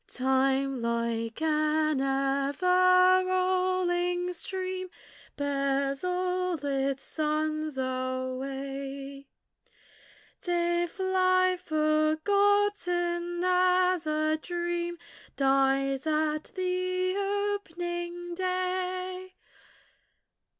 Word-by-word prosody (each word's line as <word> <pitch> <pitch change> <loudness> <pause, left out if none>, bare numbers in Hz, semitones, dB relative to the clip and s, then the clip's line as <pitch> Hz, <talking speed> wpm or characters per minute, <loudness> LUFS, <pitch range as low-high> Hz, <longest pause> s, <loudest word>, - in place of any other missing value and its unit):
Time 265 0 +1
like 235 +2 -2
an 310 -2 +1
ever 360 +8 +3
rolling 365 -1 0
stream 370 +1 -4 0.5
Bears 275 0 -1
all 365 0 0
its 275 -1 -1
sons 310 -1 -2
away; 270 +2 -4 1.1
They 345 0 0
fly, 370 0 +2
forgotten, 350 +2 +1
as 365 -1 +3
a 310 0 +1
dream 345 0 -3 0.4
Dies 270 0 +2
at 310 0 0
the 365 0 -1 0.5
opening 345 0 -5
day. 370 0 -3
345 Hz, 65 wpm, -28 LUFS, 275-365 Hz, 1.1 s, ever